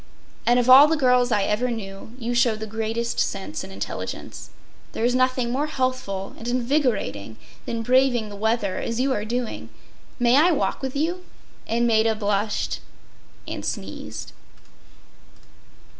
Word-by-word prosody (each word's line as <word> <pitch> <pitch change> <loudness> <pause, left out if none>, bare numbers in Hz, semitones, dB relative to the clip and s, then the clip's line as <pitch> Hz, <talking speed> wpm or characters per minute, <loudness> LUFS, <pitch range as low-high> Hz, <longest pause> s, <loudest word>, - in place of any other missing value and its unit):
And 240 +1 +5
of 245 -1 +2
all 265 +3 +10
the 320 +1 +1
girls 250 -3 +3
I 205 -3 +2
ever 215 +5 0
knew, 220 0 -7
you 240 -1 -3
show 240 -2 +3
the 215 0 -5
greatest 225 +2 -2
sense 195 -1 -2
and 190 - -9
intelligence. - - -6 0.4
There 225 - -1
is 245 - +2
nothing 255 -1 +1
more 280 +4 0
healthful 255 -9 -2
and 230 - -7
invigorating 240 - -1 0.3
than 230 -1 -2
braving 250 -2 +3
the 205 - -8
weather 215 -1 0
as 230 +1 -3
you 265 +1 +2
are 210 -2 -2
doing. 240 +1 -3 0.5
May 245 +1 +4
I 335 +4 +5
walk 290 - -1
with 265 0 -4
you?” 340 +5 -1 0.4
And 235 +1 +1
Maida 225 -1 +3
blushed 210 0 -1 0.7
and - - -5
sneezed. - - -5
235 Hz, 150 wpm, -24 LUFS, 215-255 Hz, 0.7 s, all